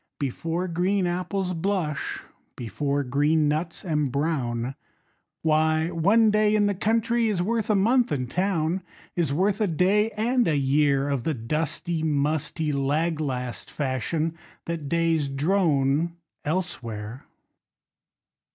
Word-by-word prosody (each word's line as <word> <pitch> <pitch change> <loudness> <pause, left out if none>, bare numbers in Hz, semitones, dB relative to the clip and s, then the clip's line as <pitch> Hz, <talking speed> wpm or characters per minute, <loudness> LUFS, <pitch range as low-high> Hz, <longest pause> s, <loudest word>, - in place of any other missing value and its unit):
Before 165 +6 -2
green 185 +3 +1
apples 180 +1 -1
blush, 165 -5 -2 0.3
Before 140 +4 -2
green 145 +4 +2
nuts 160 +5 -2
embrown, 140 -5 -1 0.7
Why, 160 +1 +2
one 205 +7 +4
day 210 0 +3
in 210 -1 +3
the 205 - +2
country 230 +4 +1
Is 200 -4 0
worth 225 +2 -1
a 215 - +4
month 235 +5 +3
in 130 -3 0
town; 175 +3 0 0.3
Is 170 -5 +1
worth 195 +7 +1
a 210 - +3
day 195 +6 +2
and 240 +3 +2
a 155 -3 +2
year 140 0 +2
Of 140 -4 -1
the 160 - -1
dusty, 155 +7 -2
musty, 150 +1 0
lag 150 +4 0
last 125 -4 -3
fashion 155 +4 -2 0.3
That 165 -4 -4
days 165 -2 +1
drone 150 0 +1 0.3
elsewhere. 125 - -4
160 Hz, 125 wpm, -25 LUFS, 140-185 Hz, 0.7 s, one